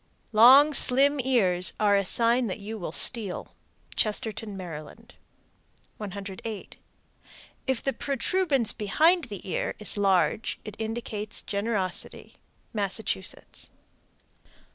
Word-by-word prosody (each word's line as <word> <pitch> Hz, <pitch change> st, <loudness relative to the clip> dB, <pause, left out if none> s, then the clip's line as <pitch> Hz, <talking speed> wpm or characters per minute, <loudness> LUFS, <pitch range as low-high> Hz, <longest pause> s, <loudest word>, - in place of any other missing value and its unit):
Long, 260 Hz, +7 st, +7 dB
slim 275 Hz, +2 st, +5 dB
ears 195 Hz, -9 st, +1 dB
are 205 Hz, -1 st, +3 dB
a 200 Hz, -2 st, +1 dB
sign 235 Hz, +3 st, +2 dB
that 185 Hz, -, -4 dB
you 215 Hz, +2 st, -7 dB
will 170 Hz, -, -5 dB
steal. 205 Hz, 0 st, +2 dB, 0.4 s
Chestertown, 215 Hz, -1 st, -2 dB
Md. 180 Hz, +6 st, -10 dB, 0.9 s
108. 200 Hz, +1 st, -8 dB, 0.9 s
If 265 Hz, -2 st, -1 dB
the 270 Hz, -, -1 dB
protuberance 275 Hz, -, 0 dB
behind 320 Hz, -, +2 dB
the 205 Hz, -4 st, -9 dB
ear 185 Hz, -, -3 dB
is 210 Hz, 0 st, 0 dB
large, 200 Hz, +2 st, +1 dB
it 215 Hz, -2 st, -8 dB
indicates 220 Hz, -2 st, -4 dB
generosity. 200 Hz, -3 st, -4 dB, 0.4 s
_Massachusetts. 200 Hz, -1 st, -4 dB
215 Hz, 100 wpm, -26 LUFS, 200-245 Hz, 0.9 s, Long